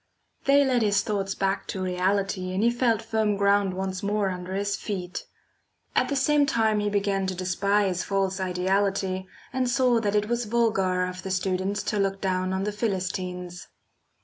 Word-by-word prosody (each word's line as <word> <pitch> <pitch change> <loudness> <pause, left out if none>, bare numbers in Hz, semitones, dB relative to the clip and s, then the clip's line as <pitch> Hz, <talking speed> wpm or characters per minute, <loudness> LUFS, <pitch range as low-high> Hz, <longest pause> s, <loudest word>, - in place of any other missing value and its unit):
They 280 +1 +5
led 255 -2 +2
his 205 -2 +2
thoughts 195 -2 -2
back 195 0 -1
to 190 - -3
reality 185 +1 0
and 195 - +1
he 235 - +4
felt 235 -2 +1
firm 220 -2 0
ground 200 -1 +2
once 190 0 -3
more 205 -1 0
under 180 +1 -5
his 200 0 0
feet. 180 -4 -5 0.7
At - - +2
the 285 - 0
same 285 +1 +3
time 220 -3 +2
he 205 0 0
began 200 -1 0
to 185 - -2
despise 185 +1 +1
false 195 -1 -1
ideality, 190 +1 0 0.3
and 255 -1 0
saw 245 -2 +3
that 210 -2 0
it 210 0 +2
was 240 +1 -1
vulgar 195 -5 +1
of 185 0 -6
the 190 - -6
students 190 +2 -1
to 210 - -1
look 195 0 0
down 185 -1 0
on 190 +1 -1
the 210 - -1
"Philistines." 185 -4 -3
195 Hz, 175 wpm, -26 LUFS, 185-210 Hz, 0.7 s, They